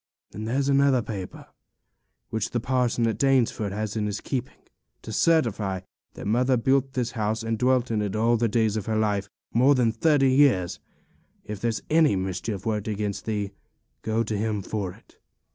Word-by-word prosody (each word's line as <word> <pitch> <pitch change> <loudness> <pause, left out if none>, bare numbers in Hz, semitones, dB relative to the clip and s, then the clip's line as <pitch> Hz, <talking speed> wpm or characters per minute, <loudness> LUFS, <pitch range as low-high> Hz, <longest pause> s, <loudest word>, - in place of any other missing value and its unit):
And 110 +2 -5
there's 135 +4 0
another 140 -3 +3
paper, 100 -5 -7 0.9
which 110 -2 -1
the 120 - -1
parson 125 -1 +1
at 115 - -1
Danesford 125 -6 +2
has 105 +1 -3
in 105 -1 -1
his 105 0 -3
keeping, 130 0 -4 0.5
to - - -7
certify 110 - +1 0.3
that - - -8
mother 125 +5 +2
built 135 +2 +1
this 125 -2 -1
house 110 -1 -2
and 115 0 -1
dwelt 125 +1 +1
in 110 -2 +1
it 105 -1 -2
all 115 +2 +3
the 115 0 +1
days 110 -1 +1
of 110 -1 -3
her 110 -1 0
life, 105 -2 0 0.2
more 130 +5 +5
than 120 -3 +3
thirty 135 +2 +3
years; 130 -11 +3 0.7
if 105 -1 -6
there's 115 -3 -1
any 155 -7 +5
mischief 95 +2 -3
worked 105 -2 -1
against 105 -1 -3
thee, 105 -3 -2 0.5
go 110 +1 0
to 110 -1 -3
him 105 -1 -1
for 100 -2 -3
it. - - -20
110 Hz, 180 wpm, -25 LUFS, 105-125 Hz, 0.9 s, more